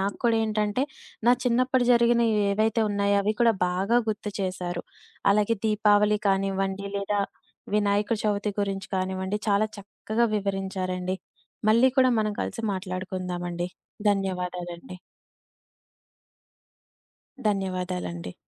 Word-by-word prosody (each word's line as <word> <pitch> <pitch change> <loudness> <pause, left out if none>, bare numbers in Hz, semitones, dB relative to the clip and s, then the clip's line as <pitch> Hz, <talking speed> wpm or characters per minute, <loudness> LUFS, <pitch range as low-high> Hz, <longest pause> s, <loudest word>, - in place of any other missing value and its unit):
నాకు 200 +1 -1
కూడా 230 -1 +4
ఏంటంటే, 215 +4 0 0.4
నా - - +8
చిన్నప్పుడు 250 +1 +2
జరిగినవి 235 -1 +4 0.2
ఏవైతే 220 +2 +2
ఉన్నాయో, 200 0 +2
అవి 210 +2 +1
కూడా 235 -1 +6 0.2
బాగా 195 +7 +2
గుర్తు 210 -1 -3
చేశారు. 180 -2 -3 0.5
అలాగే 210 +2 +2
దీపావళి 210 0 +4
కానివ్వండి, 195 0 0
లేదా 200 +1 0 0.5
వినాయక 205 +1 +2
చవితి 205 0 0
గురించి 195 -1 -2
కానివ్వండి, 190 +2 -2
చాలా 205 +2 +3
చక్కగా 215 +3 -2
వివరించారండి. 190 -2 -2 0.5
మళ్ళీ 235 +4 +6
కూడా 255 0 +6
మనం 215 -1 +1
కలిసి 230 - -4
మాట్లాడుకుందామండి. 180 -2 -4 0.4
ధన్యవాదాలండి. 180 -3 -2 2.5
ధన్యవాదాలండి. 180 - -3
200 Hz, 100 wpm, -26 LUFS, 185-215 Hz, 2.5 s, నా